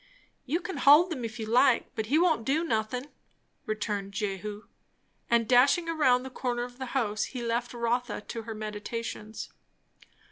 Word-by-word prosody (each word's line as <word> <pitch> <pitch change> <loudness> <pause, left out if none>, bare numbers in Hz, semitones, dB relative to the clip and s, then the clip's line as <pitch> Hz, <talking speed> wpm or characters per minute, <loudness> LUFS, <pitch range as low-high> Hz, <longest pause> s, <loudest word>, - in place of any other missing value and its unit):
"You 325 +7 0
can 380 +1 -5
hold 320 +5 +6
'em 255 -6 -6
if 225 0 -5
you 220 - -4
like, 245 +5 +3
but 220 -4 -3
he 285 +7 +3
won't 325 -8 +3
do 285 +7 +1
nothin'," 250 -1 -2 0.6
returned 205 -2 -3
Jehu. 205 0 -4 0.7
And 235 -1 +3
dashing 260 +8 +5
round 265 -6 +2
the 265 - -7
corner 245 -1 -2
of 245 +1 -9
the 260 - -4
house, 215 -4 0
he 250 -2 -6
left 235 +1 -1
Rotha 240 0 -1
to 230 +2 -6
her 225 0 -7
meditations. 215 +1 -5
240 Hz, 165 wpm, -28 LUFS, 215-265 Hz, 0.7 s, hold